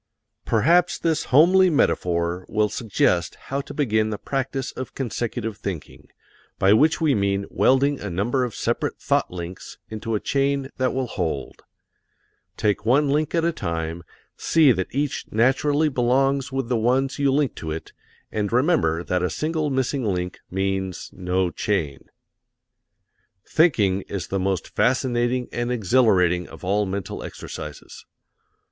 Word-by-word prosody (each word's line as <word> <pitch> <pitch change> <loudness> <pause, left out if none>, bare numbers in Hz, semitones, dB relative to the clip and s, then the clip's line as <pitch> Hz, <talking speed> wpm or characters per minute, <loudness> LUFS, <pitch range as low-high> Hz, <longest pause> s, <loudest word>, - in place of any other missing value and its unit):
Perhaps 170 +10 +3
this 160 -2 0
homely 180 +7 +5
metaphor 90 - +1
will 105 -1 +1
suggest 95 -7 0
how 140 +1 -4
to - - -11
begin 110 -6 +1
the 105 - -3
practise 135 +2 -3
of 130 - -7
consecutive 115 -3 -3
thinking, 90 -8 -7 0.5
by 95 +2 +4
which 155 +9 +4
we 155 -4 +3
mean 100 -2 0
welding 140 +2 +3
a 105 - -5
number 110 +9 0
of 120 -3 -4
separate - - -1
thought - - +1
links 90 0 -8
into 110 +1 -3
a - - 0
chain 140 +1 0
that 130 -1 +1
will 130 -1 0
hold. 80 - -4 1.0
Take 105 -2 0
one 135 +6 +3
link 150 +3 0
at 165 -1 +2
a 170 - +2
time, 85 - -4 0.3
see 155 -5 +4
that 95 -4 -1
each 140 +1 -2
naturally 140 +6 +2
belongs 135 +1 +1
with 135 -2 -2
the 125 -1 +1
ones 130 +5 +1
you 140 -1 +3
link 140 -2 +1
to 80 - -5
it, 80 +1 -6 0.4
and 105 -1 -2
remember 120 - +2
that 90 0 -1
a 90 - 0
single 155 -1 -1
missing 130 0 -1
link 90 -4 -2
means 95 -1 -2
no 90 -1 -1
chain. 85 -12 -2 1.4
Thinking 105 - +3
is 95 -5 -4
the 95 - -1
most 95 -1 -1
fascinating 125 -1 +1
and 120 +1 -2
exhilarating 95 -6 +2
of - - -13
all 100 +2 +1
mental 95 -1 -4
exercises. - - -9
120 Hz, 145 wpm, -23 LUFS, 95-135 Hz, 1.4 s, homely